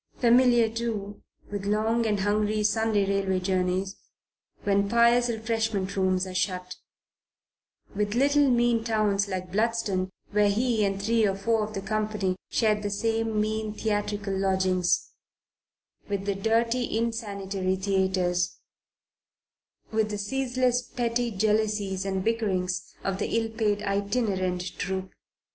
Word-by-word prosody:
Familiar, 240 Hz, -1 st, +5 dB
too, 220 Hz, -3 st, -4 dB, 0.3 s
with 200 Hz, -1 st, -4 dB
long 220 Hz, +2 st, +1 dB
and 205 Hz, -2 st, 0 dB
hungry 210 Hz, +1 st, +1 dB
Sunday 215 Hz, -1 st, +2 dB
railway 195 Hz, -1 st, 0 dB
journeys 185 Hz, +1 st, -1 dB, 0.7 s
when 200 Hz, 0 st, +2 dB
pious 235 Hz, +1 st, +4 dB
refreshment 220 Hz, -3 st, -1 dB
rooms 185 Hz, -1 st, +1 dB
are 185 Hz, -, -7 dB
shut; 180 Hz, 0 st, -2 dB, 1.2 s
with 205 Hz, +1 st, -1 dB
little 285 Hz, +2 st, +4 dB
mean 240 Hz, -2 st, +2 dB
towns 210 Hz, -3 st, +1 dB
like 185 Hz, -2 st, -4 dB
Bludston, 210 Hz, -3 st, 0 dB, 0.2 s
where 210 Hz, 0 st, +3 dB
he 225 Hz, +1 st, +1 dB
and 195 Hz, -1 st, 0 dB
three 225 Hz, +3 st, +2 dB
or 195 Hz, -, 0 dB
four 220 Hz, +3 st, +1 dB
of 215 Hz, 0 st, -6 dB
the 195 Hz, -, -3 dB
company 210 Hz, -2 st, -1 dB
shared 215 Hz, -2 st, +2 dB
the 205 Hz, -, -2 dB
same 225 Hz, +1 st, 0 dB
mean 215 Hz, 0 st, -1 dB
theatrical 205 Hz, -2 st, -2 dB
lodgings; 190 Hz, -2 st, +1 dB, 1.0 s
with 200 Hz, -1 st, -2 dB
the 200 Hz, -, +1 dB
dirty, 230 Hz, +4 st, 0 dB
insanitary 200 Hz, -5 st, -2 dB
theatres; 190 Hz, -2 st, 0 dB, 1.3 s
with 220 Hz, -1 st, +1 dB
the 210 Hz, -, -3 dB
ceaseless 250 Hz, +3 st, 0 dB
petty 240 Hz, -1 st, -1 dB
jealousies 210 Hz, -2 st, 0 dB
and 190 Hz, -1 st, -1 dB
bickerings 185 Hz, -5 st, -1 dB
of 195 Hz, 0 st, -2 dB
the -, -, 0 dB
ill 225 Hz, -1 st, -1 dB
paid 210 Hz, -2 st, 0 dB
itinerant 200 Hz, -3 st, 0 dB, 0.2 s
troupe. 190 Hz, +2 st, -3 dB
210 Hz, 125 wpm, -27 LUFS, 195-225 Hz, 1.3 s, Familiar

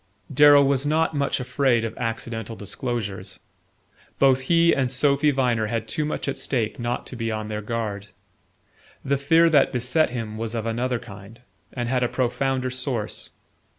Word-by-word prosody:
Darrow 145 Hz, +1 st, +7 dB
was 135 Hz, -1 st, +2 dB
not 160 Hz, +2 st, +1 dB
much 140 Hz, -1 st, 0 dB
afraid 125 Hz, -2 st, +1 dB
of 115 Hz, -, -5 dB
accidental 115 Hz, -1 st, -4 dB
disclosures. 100 Hz, -3 st, -4 dB, 0.8 s
Both 135 Hz, -1 st, +4 dB
he 170 Hz, 0 st, +5 dB
and 130 Hz, -3 st, 0 dB
Sophy 140 Hz, +2 st, +2 dB
Viner 125 Hz, -5 st, +1 dB
had 115 Hz, 0 st, -3 dB
too 155 Hz, -, -1 dB
much 150 Hz, -, -4 dB
at 140 Hz, -, -2 dB
stake 120 Hz, -5 st, -1 dB
not 120 Hz, +1 st, -3 dB
to -, -, -8 dB
be 115 Hz, -1 st, -3 dB
on 110 Hz, 0 st, -4 dB
their 105 Hz, 0 st, -4 dB
guard. 105 Hz, -2 st, -4 dB, 1.0 s
The 140 Hz, 0 st, +1 dB
fear 165 Hz, +4 st, +4 dB
that 145 Hz, -3 st, +4 dB
beset 125 Hz, +6 st, +1 dB
him 115 Hz, -3 st, -5 dB
was 115 Hz, 0 st, -3 dB
of 115 Hz, -1 st, -3 dB
another 120 Hz, +2 st, -1 dB
kind, 100 Hz, +2 st, -12 dB, 0.3 s
and 120 Hz, -2 st, -4 dB
had 125 Hz, 0 st, 0 dB
a 125 Hz, -, +1 dB
profounder 130 Hz, +1 st, -1 dB
source. 125 Hz, -4 st, -2 dB
125 Hz, 165 wpm, -24 LUFS, 115-140 Hz, 1.0 s, Darrow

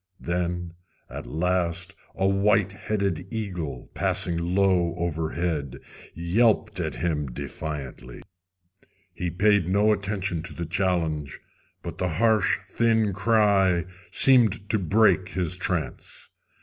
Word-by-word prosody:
Then 90 Hz, 0 st, -3 dB, 0.4 s
at -, -, -7 dB
last 90 Hz, +2 st, -1 dB, 0.2 s
a 95 Hz, -, +1 dB
white 100 Hz, 0 st, +2 dB
headed 100 Hz, -4 st, -2 dB
eagle, 90 Hz, -, -5 dB
passing 85 Hz, -, 0 dB, 0.2 s
low 90 Hz, -4 st, +2 dB
overhead, 80 Hz, -4 st, -2 dB, 0.4 s
yelped 105 Hz, +4 st, +1 dB
at 80 Hz, -6 st, -3 dB
him 75 Hz, -3 st, -2 dB
defiantly. 70 Hz, -2 st, -7 dB, 0.9 s
He 90 Hz, -, -3 dB
paid 95 Hz, 0 st, +2 dB
no 105 Hz, +3 st, +3 dB
attention 95 Hz, -4 st, -2 dB
to 85 Hz, -, -7 dB
the 85 Hz, -, -4 dB
challenge, 80 Hz, -5 st, -1 dB, 0.4 s
but 85 Hz, +1 st, -7 dB
the 90 Hz, -, 0 dB
harsh, 110 Hz, +3 st, +2 dB
thin 115 Hz, -3 st, +1 dB
cry 100 Hz, -5 st, +3 dB, 0.2 s
seemed 115 Hz, -6 st, +5 dB
to 110 Hz, -, +2 dB
break 95 Hz, -1 st, +3 dB
his 90 Hz, -3 st, -1 dB
trance. 90 Hz, -3 st, -5 dB
90 Hz, 110 wpm, -25 LUFS, 85-100 Hz, 0.9 s, seemed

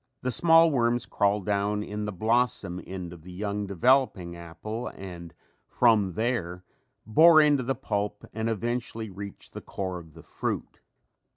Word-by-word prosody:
The 130 Hz, -, 0 dB
small 165 Hz, +4 st, +5 dB
worms 120 Hz, -2 st, +1 dB
crawl 100 Hz, 0 st, +1 dB
down 105 Hz, +1 st, 0 dB
in 105 Hz, 0 st, -4 dB
the 105 Hz, -, -3 dB
blossom 110 Hz, -3 st, 0 dB
end 90 Hz, -2 st, -6 dB
of 85 Hz, -, -12 dB
the 90 Hz, +3 st, -12 dB
young 100 Hz, +2 st, -3 dB
developing 100 Hz, -3 st, +2 dB
apple 95 Hz, +8 st, -6 dB
and 85 Hz, -3 st, -9 dB, 0.4 s
from 110 Hz, -6 st, +3 dB
there 95 Hz, -5 st, -2 dB, 0.4 s
bore 155 Hz, +8 st, +7 dB
into 150 Hz, -3 st, +4 dB
the 130 Hz, +2 st, -1 dB
pulp 105 Hz, -5 st, -3 dB
and 110 Hz, +1 st, -2 dB
eventually 115 Hz, 0 st, -3 dB
reach 100 Hz, +1 st, -9 dB
the -, -, -8 dB
core 95 Hz, -2 st, -4 dB
of 80 Hz, -2 st, -15 dB
the 80 Hz, -, -13 dB
fruit. -, -, -4 dB
105 Hz, 155 wpm, -27 LUFS, 90-120 Hz, 0.4 s, bore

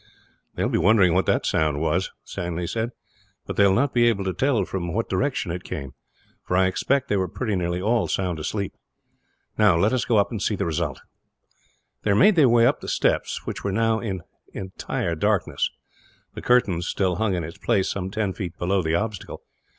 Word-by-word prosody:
"They -, -, -1 dB
will -, -, 0 dB
be -, -, +2 dB
wondering 95 Hz, -1 st, +4 dB
what 95 Hz, +2 st, +2 dB
the -, -, +3 dB
sound 75 Hz, -2 st, +1 dB, 0.2 s
is," 95 Hz, +2 st, 0 dB
Stanley 85 Hz, 0 st, -4 dB
said, 115 Hz, +6 st, -2 dB, 0.6 s
"but -, -, -5 dB
they 100 Hz, -, +5 dB
will 95 Hz, -, +3 dB
not 140 Hz, +4 st, +1 dB
be 120 Hz, -1 st, +4 dB
able 105 Hz, -4 st, +1 dB
to 95 Hz, -1 st, -2 dB
tell 120 Hz, -1 st, +1 dB
from 85 Hz, -2 st, -4 dB
what 115 Hz, +3 st, -1 dB
direction 130 Hz, -10 st, -1 dB
it 90 Hz, +1 st, -5 dB
came; 70 Hz, -2 st, -6 dB, 0.5 s
for 90 Hz, -, -1 dB
I 95 Hz, -, +4 dB
expect 135 Hz, +8 st, 0 dB
they 105 Hz, -, +1 dB
were 95 Hz, -1 st, 0 dB
pretty 110 Hz, +3 st, -2 dB
nearly 90 Hz, -1 st, -1 dB
all 110 Hz, +4 st, +1 dB
sound 90 Hz, -4 st, -1 dB
asleep. 100 Hz, +6 st, -3 dB, 0.9 s
Now, 105 Hz, -6 st, +5 dB
let 100 Hz, +8 st, +2 dB
us 130 Hz, -, +1 dB
go 115 Hz, -, +2 dB
up 100 Hz, -, +2 dB
and 110 Hz, -4 st, -4 dB
see 105 Hz, -, 0 dB
the -, -, -2 dB
result." 80 Hz, -4 st, -2 dB, 1.0 s
They 105 Hz, -, 0 dB
made 190 Hz, -, +5 dB
their 145 Hz, -6 st, +5 dB
way 115 Hz, 0 st, +5 dB
up 130 Hz, +3 st, +2 dB
the -, -, -9 dB
steps, -, -, 0 dB
which -, -, -5 dB
were 100 Hz, -, -1 dB
now 115 Hz, +2 st, +1 dB
in 95 Hz, -6 st, -4 dB, 0.3 s
entire 95 Hz, -2 st, -3 dB
darkness. 100 Hz, +1 st, 0 dB, 0.6 s
The -, -, -7 dB
curtain 105 Hz, -9 st, +2 dB
still 90 Hz, 0 st, -1 dB
hung 105 Hz, -4 st, +1 dB
in 85 Hz, -, -2 dB
its 85 Hz, +2 st, -8 dB
place, 95 Hz, -, +1 dB
some 95 Hz, -1 st, -3 dB
ten 105 Hz, -1 st, -2 dB
feet 90 Hz, -3 st, -6 dB
below 95 Hz, +2 st, +1 dB
the 80 Hz, -1 st, 0 dB
obstacle. 105 Hz, +1 st, -4 dB
95 Hz, 205 wpm, -24 LUFS, 90-110 Hz, 1.0 s, they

